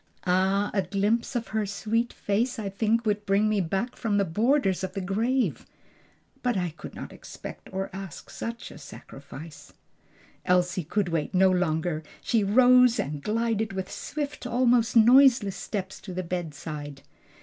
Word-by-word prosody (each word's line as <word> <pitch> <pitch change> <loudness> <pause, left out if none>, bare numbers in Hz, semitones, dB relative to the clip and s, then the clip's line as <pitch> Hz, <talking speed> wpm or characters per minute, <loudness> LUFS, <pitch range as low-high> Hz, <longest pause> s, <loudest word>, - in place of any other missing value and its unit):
"Ah, 190 +3 +2
a 195 - +2
glimpse 205 +7 0
of 235 -1 -2
her 220 -1 0
sweet 215 +4 -1
face 230 +6 -1
I 210 -3 -3
think 220 +4 0
would 210 -1 0
bring 200 +2 +3
me 215 -2 +2
back 195 +8 -2
from 210 -4 -1
the 200 - +2
borders 205 - +1
of 190 - -3
the - - -3
grave! 225 +7 0 0.7
But 245 -4 0
I 180 -2 -1
could 155 - -10
not - - -8
expect - - -10
or 190 0 -3
ask 190 -4 -8
such 230 +1 -6
a - - -11
sacrifice." 140 +2 -11 0.7
Elsie 180 0 +2
could 200 +2 0
wait 165 +2 -2
no 190 0 +5
longer; 160 -3 0 0.2
she 225 -3 +1
rose 250 +3 +5
and 145 +1 -3
glided 220 0 -1
with 190 0 -4
swift, 285 +6 -5
almost 245 -1 +2
noiseless 240 -3 +6
steps 190 -2 -5
to 185 -3 -8
the 185 - -2
bedside. 150 -4 -5
200 Hz, 160 wpm, -27 LUFS, 180-230 Hz, 0.7 s, noiseless